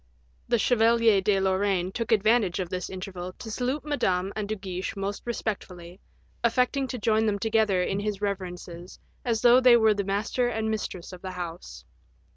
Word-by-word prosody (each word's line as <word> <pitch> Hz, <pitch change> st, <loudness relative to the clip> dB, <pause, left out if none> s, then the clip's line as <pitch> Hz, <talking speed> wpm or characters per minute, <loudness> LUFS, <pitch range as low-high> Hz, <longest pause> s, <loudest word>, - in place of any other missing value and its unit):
The 240 Hz, -, +2 dB
Chevalier 230 Hz, -2 st, +4 dB
de 195 Hz, 0 st, +2 dB
Lorraine 190 Hz, -1 st, +1 dB
took 230 Hz, +3 st, -4 dB
advantage 215 Hz, -3 st, +3 dB
of 180 Hz, -2 st, -3 dB
this 180 Hz, 0 st, -4 dB
interval 185 Hz, -1 st, -6 dB
to 220 Hz, -, -9 dB
salute 255 Hz, +6 st, -2 dB
Madame 190 Hz, -10 st, 0 dB
and 210 Hz, -1 st, -3 dB
De 215 Hz, -, -1 dB
Guiche 190 Hz, 0 st, -5 dB
most 200 Hz, +1 st, -4 dB
respectfully, 185 Hz, -6 st, -5 dB, 0.4 s
affecting 250 Hz, +3 st, +1 dB
to 255 Hz, -, -4 dB
join 220 Hz, 0 st, +2 dB
them 205 Hz, -1 st, +1 dB
together 215 Hz, -4 st, +2 dB
in 195 Hz, +2 st, -1 dB
his 205 Hz, -1 st, -3 dB
reverences 180 Hz, -3 st, -5 dB, 0.3 s
as 230 Hz, -3 st, -1 dB
though 245 Hz, +1 st, +7 dB
they 250 Hz, -2 st, +7 dB
were 220 Hz, -2 st, +4 dB
the 200 Hz, -1 st, -2 dB
master 205 Hz, +5 st, 0 dB
and 220 Hz, -2 st, -1 dB
mistress 190 Hz, -4 st, -5 dB
of 180 Hz, -, -10 dB
the 190 Hz, -, -5 dB
house. 175 Hz, -1 st, -7 dB
205 Hz, 175 wpm, -26 LUFS, 185-230 Hz, 0.4 s, though